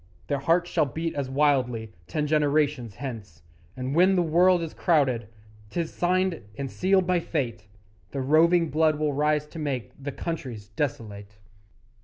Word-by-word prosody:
Their 140 - -1
hearts 175 +5 +1
shall 155 -4 +2
beat 160 +5 -3
as 140 -2 -3
wildly 130 -6 +1 0.2
Ten 150 - -1
generations 145 -6 +1
hence; 105 - -8 0.3
And 130 +1 -3
when 185 +4 +5
the 180 - +3
world 175 +2 +4
is 160 - -6
crowded 130 - +1 0.4
'Tis 165 +6 -3
signed 185 0 +1 0.2
and 135 -1 -4
sealed 190 0 +2
by 180 0 +2
Fate 120 -11 -3 0.4
The 135 - -4
roving 165 +4 +4
blood 155 0 +3
will 150 -1 0
rise 150 +1 +1
to 165 - -9
make 135 -8 -3
The 145 - -3
countries 125 -10 -5
desolate. 105 -4 -4
150 Hz, 155 wpm, -26 LUFS, 125-165 Hz, 0.4 s, when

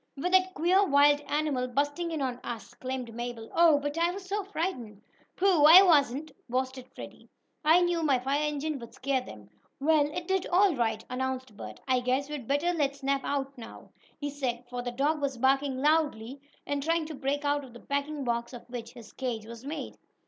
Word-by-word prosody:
With 355 +6 -2
that 370 0 +3
queer 360 +6 +3
wild 290 -3 +4
animal 290 -4 0
bursting 290 +6 -1
in 315 -4 -2
on 250 -2 -3
us!" 230 -2 -6
exclaimed 255 -2 -5
Mabel. 235 -1 -6
"Oh, 330 -3 +6
but 290 +2 -3
I 340 +1 +3
was 380 +2 -6
so 405 +2 -2
frightened!" 315 - -4 0.4
"Pooh! 360 -6 +4
I 345 +5 +10
wasn't!" 295 -3 +3 0.2
boasted 260 +1 -2
Freddie. - - -11 0.3
"I 320 +4 +6
knew 350 -1 +1
my 285 -5 +3
fire 270 +4 -1
engine 300 0 -2
would 235 -1 -11
scare 265 -1 0
them." 105 - -12 0.3
"Well, 295 0 +3
it 345 +2 -5
did 380 -1 0
all 375 +1 +4
right," 225 -3 -1
announced 260 -2 -4
Bert 105 - -9
"I 255 -1 +3
guess 260 +3 -1
we'd 275 -6 -6
better 290 +6 +1
let 285 -4 0
Snap 275 0 -1
out 275 -1 -2
now," 225 - -11 0.3
he 290 -1 -4
said, 250 -4 -3
for 245 0 -3
the 245 - -3
dog 290 +5 0
was 275 -2 -2
barking 270 +2 +2
loudly, 285 -5 +1 0.2
and 285 0 -2
trying 330 +2 0
to 315 - -7
break 285 +1 -2
out 290 0 +1
of 260 - -12
the 240 - -11
packing 285 +2 -3
box 235 0 -2
of 240 - -9
which 235 -1 -7
his 235 -4 -13
cage 240 -5 -4
was 230 +1 -10
made. 295 +4 -6
280 Hz, 200 wpm, -29 LUFS, 250-310 Hz, 0.4 s, I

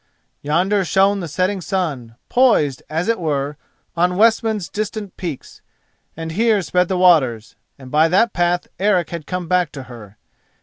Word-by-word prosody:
Yonder 185 +7 +1
shone 195 +3 +2
the 175 - -5
setting 185 +5 -1
sun, 150 - -3
poised, 190 - +2
as 165 +5 -2
it 230 -2 +1
were, 145 -3 -2 0.4
on 180 +1 +1
Westman's 220 -3 +2
distant 210 -2 -5
peaks, 165 -8 -7 0.6
and 165 0 -5
here 215 +2 +2
sped 180 +2 +1
the 185 - -1
waters, 140 -12 +3 0.2
and 130 -2 -12
by 155 +2 +4
that 195 +8 +2
path 175 0 0
Eric 185 -4 +1
had 170 -3 -6
come 180 -2 -4
back 180 -2 +1
to 135 - -7
her. 115 -5 -13
180 Hz, 160 wpm, -19 LUFS, 150-195 Hz, 0.6 s, by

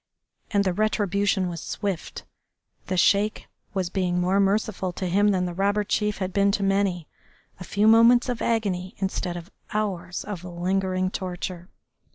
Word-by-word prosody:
And 200 -2 +2
the 185 -2 0
retribution 200 -1 +1
was 170 -2 -5
swift. 195 -5 -4 0.6
The 185 - -1
Sheik 205 +4 +2 0.3
was 185 -2 -1
being 180 -2 0
more 185 +2 +2
merciful 200 -1 +1
to 185 - -4
him 200 +4 +3
than 185 -3 +2
the 175 - -4
robber 200 +3 +1
chief 210 0 0
had 185 -1 -3
been 200 0 +3
to 200 - 0
many, 195 -4 +1 0.5
a - - -6
few 200 +3 0
moments 230 +2 +6
of 245 -2 -3
agony 195 -5 -1
instead 190 -2 -2
of 175 +4 -10 0.2
hours 185 -4 -2
of 200 -4 -6
lingering 185 +1 -1
torture. 180 -1 -5
195 Hz, 160 wpm, -25 LUFS, 180-205 Hz, 0.6 s, moments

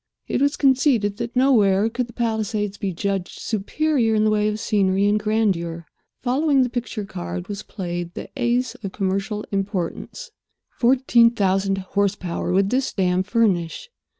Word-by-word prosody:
It - - -1
was 285 +1 +2
conceded 255 -7 +2
that 235 +1 -5
nowhere 220 -6 +4
could 240 +2 -2
the 235 - -14
Palisades 220 -3 -1
be 200 -1 -3
judged 195 +1 -3
superior 230 +2 0
in 215 - +3
the 215 - +3
way 210 0 +2
of 215 0 -2
scenery 200 -3 +1
and 205 +1 +3
grandeur. 190 -6 0 0.4
Following 270 +2 +3
the 250 - -1
picture 240 -4 -4
card 85 - -6
was 205 0 -5
played 175 -3 -5
the - - -6
ace 245 -1 0
of 195 -3 -8
commercial 195 +1 -2
importance. 195 - -3 0.5
Fourteen 245 -2 +5
thousand 195 -3 +1 0.2
horsepower 195 -4 -1
would 195 +2 +2
this 260 +1 +1
dam 185 -2 +1
furnish. 205 - 0
210 Hz, 150 wpm, -22 LUFS, 195-240 Hz, 0.5 s, Fourteen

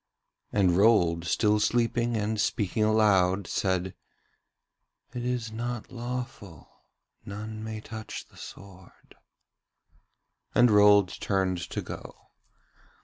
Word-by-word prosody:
And 95 -4 +3
Rold, 90 -5 +3
still 105 +4 +2
sleeping 120 +1 +1
and 105 0 -1
speaking 105 +1 0
aloud, 100 -3 +3
said: 95 0 -1 1.2
'It 120 -1 -4
is 125 -3 -2
not 120 0 -5
lawful; 120 - -6 0.6
none 110 +2 -7
may 110 -1 -6
touch 110 0 -8
the - - -22
sword.' 95 -2 -13 1.4
And 120 -1 +5
Rold 105 -2 +6
turned 95 -2 0
to - - -4
go. - - -10
105 Hz, 100 wpm, -27 LUFS, 95-115 Hz, 1.4 s, Rold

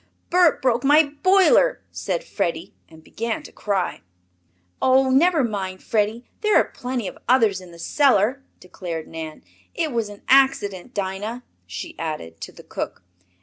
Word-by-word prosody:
"Bert 355 -5 +4
broke 245 -1 +2
my 295 +3 +6 0.2
boiler!" 390 +6 +4
said - - -3
Freddie, 180 - -3 0.2
and 160 -1 -16
began 230 +6 -4
to - - -12
cry. 195 -3 -2 0.8
"Oh, 260 0 +4
never 315 +2 +4
mind, 195 -5 -4
Freddie, 220 +2 -1
there 425 -1 +2
are - - +6
plenty 245 -4 -4
of - - -8
others 225 -7 +3
in 180 -1 -13
the 170 - -13
cellar," 255 - +2 0.2
declared 175 -3 -7
Nan. 160 -1 -8 0.3
"It 325 -3 -1
was 230 -3 -1
an 205 0 -12
accident, 255 -5 +2
Dinah," 205 +5 -4 0.2
she 335 - -7
added, 115 - -5
to - - -7
the - - -15
cook. - - -6
225 Hz, 150 wpm, -22 LUFS, 185-270 Hz, 0.8 s, my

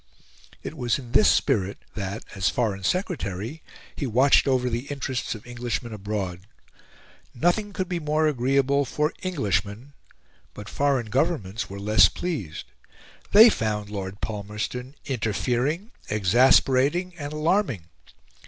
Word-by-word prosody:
It - - -6
was 120 -5 0
in 125 -4 -10
this 135 - +5
spirit 100 -8 +1 0.2
that, 100 +1 -5
as 95 0 +1
Foreign 105 -5 -1
Secretary, 145 - -2 0.3
he 140 - -3
watched 130 +5 +4
over 130 -2 +2
the 120 +3 -3
interests 130 -4 -3
of 105 - -12
Englishmen 120 -1 -4
abroad. 95 -3 -4 0.9
Nothing 175 - +1
could 185 -2 -3
be 175 -1 -2
more 155 0 +1
agreeable 140 0 +2
for 150 +4 -1
Englishmen; 110 - -2 0.6
but 105 - -9
foreign 135 -6 0
governments 125 - -1
were 100 +1 -7
less 105 +2 +5
pleased. 145 - -4 0.7
They 220 +3 +10
found 105 - -2
Lord 100 -1 -6
Palmerston 110 +5 -5
interfering, 130 - -1 0.2
exasperating, 130 - +3
and 145 0 -5
alarming. 150 - 0
125 Hz, 125 wpm, -25 LUFS, 105-145 Hz, 0.9 s, They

